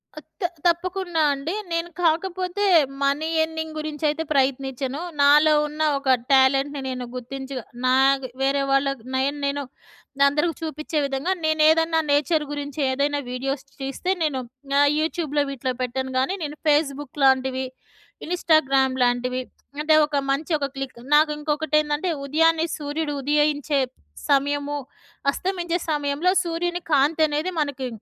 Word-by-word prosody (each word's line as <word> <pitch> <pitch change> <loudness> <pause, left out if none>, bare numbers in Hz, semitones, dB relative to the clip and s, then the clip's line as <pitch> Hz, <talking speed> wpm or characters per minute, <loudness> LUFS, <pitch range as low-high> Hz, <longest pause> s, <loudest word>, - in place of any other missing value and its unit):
ఆ! - - -7 0.2
త్ - - +1 0.2
తప్పకుండా 350 0 0
అండి. 280 +5 -4 0.2
నేను 335 +1 -1
కాకపోతే 365 +4 0 0.4
మనీ 280 +3 +1 0.2
ఎర్నింగ్ 320 0 -5
గురించి 305 0 -6
అయితే 310 +2 -2
ప్రయత్నించను. 270 +1 -1 0.2
నాలో 300 +2 +6
ఉన్న 300 +1 -6 0.2
ఒక 270 -1 +2 0.2
టాలెంట్‌ని 270 +1 +3
నేను 250 -1 -4
గుర్తించి. 265 +2 -6 0.3
నా 255 0 +4 0.5
వేరే 275 +1 +2
వాళ్ళకి 275 -3 +1
నేను 275 +2 0
నేను 280 0 -1 0.6
అందరికి 300 +4 +1
చూపించే 310 0 -3
విధంగా 275 +6 -2
నేను 315 0 +1
ఏదన్నా 325 0 +3
నేచర్ 300 +2 +2
గురించి 290 0 -5
ఏదైనా 285 +2 0
వీడియోస్ 270 +2 -3 0.2
తీస్తే, 270 +7 -2
నేను 290 -4 0 0.4
ఆహ్, 285 0 +5
యూట్యూబ్‍లో 310 -2 -1
వీటిలో 260 -1 -3
పెట్టాను 260 +1 -2
గానీ, 270 +9 0
నేను 295 0 -4
ఫేస్‌బుక్ 290 -1 0
లాంటివి. 265 0 +3 0.6
ఇన్స్టాగ్రామ్ 275 -6 +2
లాంటివి. 250 +1 0 0.4
అంటే 310 +1 +3
ఒక 295 -1 -2
మంచి 295 +5 -2
ఒక 280 -2 -2
క్లిక్ 270 -2 -6 0.2
నాకు 300 +1 +5
ఇంకొకటి 300 0 -1
ఏందంటే, 300 +4 -2 0.2
ఉదయాన్నే 325 +3 +3
సూర్యుడు 295 +1 -3
ఉదయించే 295 0 +1 0.5
సమయము. 285 +1 +1 0.5
అస్తమించే 350 +1 -2
సమయంలో 295 +4 +1
సూర్యుని 345 +1 -2
కాంతి 295 +3 +3
అనేది 305 +5 -1
మనకి 275 -3 -3
290 Hz, 130 wpm, -23 LUFS, 270-320 Hz, 0.6 s, నాలో